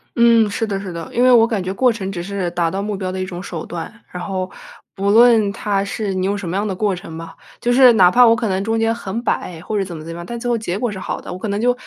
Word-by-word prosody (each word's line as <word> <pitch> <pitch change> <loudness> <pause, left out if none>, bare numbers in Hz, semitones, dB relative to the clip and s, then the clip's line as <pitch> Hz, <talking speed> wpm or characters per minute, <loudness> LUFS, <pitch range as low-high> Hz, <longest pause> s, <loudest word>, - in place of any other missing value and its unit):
嗯， 230 -2 +5
是 220 +2 -2
的 200 -2 -2
是 190 - -6
的。 170 -1 -7
因 245 - +2
为 255 - +6
我 230 -2 +6
感 220 -5 -2
觉 185 +1 -3
过 250 +5 +3
程 195 -4 -4
只 175 -3 -4
是 190 -1 -3
达 170 -1 0
到 195 +4 -3
目 210 -1 -3
标 185 -1 -3
的 190 - -4
一 - - -2
种 180 -1 -7
手 170 -4 -6
段， 175 +7 -7
然 180 - -6
后 185 0 -3 0.4
不 200 +1 -1
论 225 -1 +6
它 200 -1 -1
是 200 0 -3
你 185 0 -1
用 200 +1 0
什 185 -4 -5
么 175 - -3
样 205 +1 -1
的 195 - -3
过 205 0 0
程 165 -2 -8
吧， 165 0 -8 0.3
就 240 - +1
是 250 -1 +7
哪 180 -4 +6
怕 245 +3 +6
我 230 - +5
可 225 -1 -2
能 190 0 0
中 225 +3 -1
间 225 0 +1
很 230 0 -5
摆 175 -8 -2
或 210 +4 -3
者 195 - 0
怎 175 -2 -7
么 155 - -8
怎 165 - -7
么 165 - -7
样， 170 - -7
但 235 +5 -6
最 245 +1 -3
后 240 - +2
结 195 -4 -3
果 240 +1 -1
是 190 - -6
好 - - -4
的。 - - -8
我 180 - -6
可 220 - -4
能 200 +1 -2
就 245 +1 +3
200 Hz, 345 characters per minute, -19 LUFS, 185-225 Hz, 0.4 s, 是